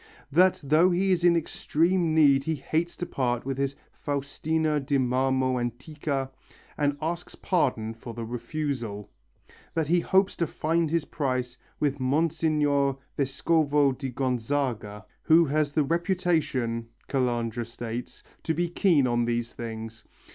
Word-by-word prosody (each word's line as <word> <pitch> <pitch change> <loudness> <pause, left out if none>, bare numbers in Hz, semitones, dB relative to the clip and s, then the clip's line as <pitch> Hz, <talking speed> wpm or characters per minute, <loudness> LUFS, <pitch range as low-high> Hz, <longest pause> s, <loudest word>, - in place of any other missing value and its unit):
That 180 +5 +4
though 155 +6 +4
he 190 +2 +2
is 175 -2 +1
in 175 -1 +6
extreme 165 +1 +1
need 140 -3 +5
he 160 - 0
hates 160 +5 -2
to 175 - -3
part 120 -5 -1
with 135 0 -3
his 140 0 -1 0.2
Faustina 150 +2 -1
di 140 0 0
marmo 130 0 +1
antica 135 +3 -3 0.4
and 145 -1 0
asks 170 +2 -3
pardon 125 - 0
for 115 0 -9
the 115 -1 -4
refusal, 120 -3 -4 0.6
that 160 -2 0
he 175 +1 +4
hopes 190 +3 +2
to 170 - 0
find 165 +2 0
his 165 -1 0
price 130 -4 -2 0.2
with 145 -1 0
Monsignor 145 0 +1 0.2
Vescovo 145 +1 +2
di 135 +1 -5
Gonzaga, 125 -4 -2 0.2
who 165 +1 +5
has 150 0 0
the 155 - +3
reputation, 160 -8 0 0.2
Calandra 120 -3 -1
states, 115 +1 -6 0.2
to 160 - -1
be 175 +2 0
keen 170 -5 +3
on 120 -1 +1
these 120 0 -2
things. 115 -1 -7
140 Hz, 140 wpm, -27 LUFS, 125-160 Hz, 0.6 s, in